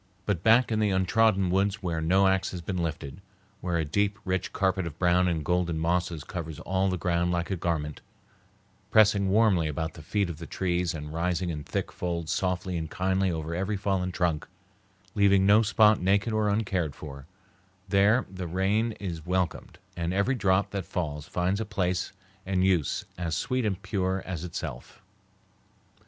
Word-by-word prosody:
But 100 -6 0
back 115 +4 +5
in 110 - +1
the 105 -1 +2
untrodden 95 0 +2
woods 100 +2 +1
where 85 -3 -1
no 95 +5 +3
axe 95 0 +1
has 90 - -6
been 90 +1 -3
lifted, 70 -4 -4 0.4
where 90 -2 -1
a 80 - 0
deep, 100 +6 0
rich 95 0 -1
carpet 95 -2 0
of 80 -1 -8
brown 90 0 +3
and 80 -4 -1
golden 90 -1 0
mosses 85 -1 -1
covers 80 -5 -6
all 95 +1 0
the 90 - -1
ground 85 0 0
like 85 +2 -1
a - - +1
garment, 80 -4 -2 0.9
pressing 100 -2 +4
warmly 100 -5 +3
about 80 +2 -3
the 80 - -11
feet 100 +5 0
of 85 -3 -7
the 85 - -7
trees 90 -2 -1
and 75 0 -7
rising 90 +1 -1
in 75 -2 -5
thick - - -3
folds 85 -3 -3
softly 90 -1 -1
and 80 -1 -4
kindly 95 -1 0
over 80 -1 -3
every 95 +4 -1
fallen 95 -2 -1
trunk, 85 -4 -1 0.7
leaving 100 -2 +4
no 105 +2 +6
spot 105 -1 +4
naked 100 +4 +2
or 110 -1 +2
uncared 95 -8 -1
for, 70 -2 -9 0.6
there 100 +6 +3
the 95 -1 -6
rain 100 +6 +1
is 90 -6 -6
welcomed, 90 +1 -2 0.2
and 85 +1 -2
every 100 +7 +2
drop 100 -5 +1
that 100 -2 -3
falls 75 -5 -4
finds 95 +4 0
a - - +1
place 95 -3 -1 0.3
and 95 -1 +1
use 90 -7 +1
as 85 -2 -1
sweet 125 +7 -1
and 100 -2 -2
pure 95 -2 -1
as 90 -4 -4
itself. 80 -7 -7
90 Hz, 175 wpm, -27 LUFS, 85-100 Hz, 0.9 s, no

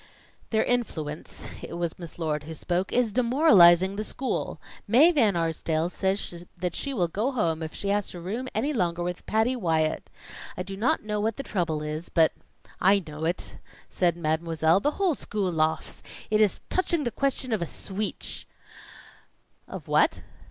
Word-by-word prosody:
"Their 220 -1 +2
influence," 160 -11 -3
it - - -7
was 170 0 -3
Miss 170 -2 -9
Lord 150 -3 -2
who 160 +1 -7
spoke, 180 +4 -1
"is 245 -3 +2
demoralizing 200 - +5
the 215 - -1
school. 260 +4 -3 0.3
Mae 295 +9 +6
Van 225 - +3
Arsdale 165 0 0
says 190 -3 -1
that 180 -1 -2
she 280 - -3
will 185 -10 +1
go 215 +10 -1
home 165 -9 0
if 160 -1 -5
she 200 - -3
has 205 0 +1
to 175 - -7
room 215 +9 -4
any 280 +8 0
longer 175 -7 0
with 180 0 -4
Patty 225 +4 +2
Wyatt. 160 -8 0 0.5
I 180 - -2
do 195 +1 -6
not 240 +9 +1
know 210 -1 -2
what 220 0 -1
the 275 - -4
trouble 165 - -1
is, 155 +2 -5
but 160 -2 +4 0.3
" - - -25
"I 200 -1 +3
know 155 +1 -5
it!" 170 +2 -3 0.3
said 175 -2 +1
Mademoiselle. 160 +1 +2
"The 290 - +1
whole 385 -4 +2
school 205 -8 -2
laughs. 160 -1 -1 0.3
It 215 0 +4
is 210 -3 +2
touching 345 -4 0
the 240 - -1
question 270 -2 -1
of 215 - 0
a 170 - -1
sweetch." 200 +5 -4 1.2
"Of - - -8
what?" - - +2
185 Hz, 175 wpm, -27 LUFS, 165-225 Hz, 1.2 s, Mae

